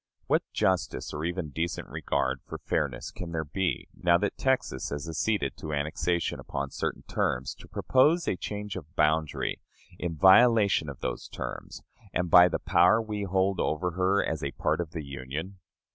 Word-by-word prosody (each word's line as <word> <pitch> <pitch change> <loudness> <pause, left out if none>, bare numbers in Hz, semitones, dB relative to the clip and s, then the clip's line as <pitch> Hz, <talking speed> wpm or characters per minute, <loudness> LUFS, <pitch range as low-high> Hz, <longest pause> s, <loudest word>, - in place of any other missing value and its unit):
What - - +2
justice, 95 -2 0
or 75 +1 -4
even 85 -2 -2
decent 85 +4 -3
regard 65 0 -1
for - - -6
fairness, - - -2
can 85 -2 -7
there 80 -1 -2
be, 90 +6 -2
now 85 -1 +3
that 105 +3 -1
Texas 130 - 0
has 75 +3 -4
acceded 80 -1 -1
to 75 - -5
annexation 80 +3 -1
upon 70 0 -4
certain - - -3
terms, 65 +2 -1
to - - -13
propose 155 +6 +3
a - - +1
change 105 +2 -5
of 80 -1 -9
boundary, 75 0 +1 0.4
in 85 -2 -3
violation 100 -2 +5
of 70 - -9
those - - -3
terms, - - -7 0.3
and 90 0 0
by 90 0 +9
the 90 - -1
power 90 +4 +4
we 105 -2 -3
hold 95 +1 +1
over 90 +3 0
her 95 +3 +2
as 80 -2 -3
a 70 - 0
part - - 0
of 85 - -5
the 80 -2 -6
Union? 70 +8 -6
85 Hz, 175 wpm, -28 LUFS, 75-95 Hz, 0.4 s, by